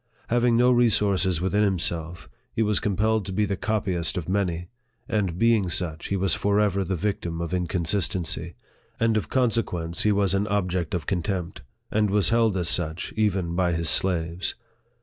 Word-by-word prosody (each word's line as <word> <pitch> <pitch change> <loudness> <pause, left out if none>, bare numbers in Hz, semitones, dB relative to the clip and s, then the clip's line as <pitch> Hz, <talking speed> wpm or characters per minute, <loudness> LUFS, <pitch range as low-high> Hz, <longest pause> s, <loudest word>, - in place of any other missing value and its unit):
Having 120 0 +3
no 125 +1 +5
re 120 -1 +4
sources 95 -5 +1
within 100 +3 +1
himself, 85 -5 -1 0.2
he 110 - 0
was 105 -1 +2
compelled 110 +2 +1
to - - -4
be 105 +3 +1
the 100 -1 -2
copyist 95 -5 -1
of 85 - -4
many, 90 -3 -1 0.4
and 100 -6 -1
being 110 -3 +3
such, 85 -2 -2
he 100 - -1
was 95 0 +1
forever 100 -1 +1
the 95 +1 -2
victim 85 -2 -3
of 85 +1 -4
inconsistency; 85 -1 -1 0.4
and 115 -1 +2
of 110 - -1
consequence 105 -10 0
he 105 - +3
was 100 -2 +2
an 100 +2 +1
object 90 -5 -1
of 80 -5 -3
contempt, 90 0 -3 0.3
and 105 -1 +2
was 100 0 +2
held 115 -3 +2
as 90 -2 -1
such 80 -1 -1
even 95 -6 0
by 90 -1 +1
his 80 -1 +1
slaves. 85 -1 0
95 Hz, 170 wpm, -25 LUFS, 85-105 Hz, 0.4 s, no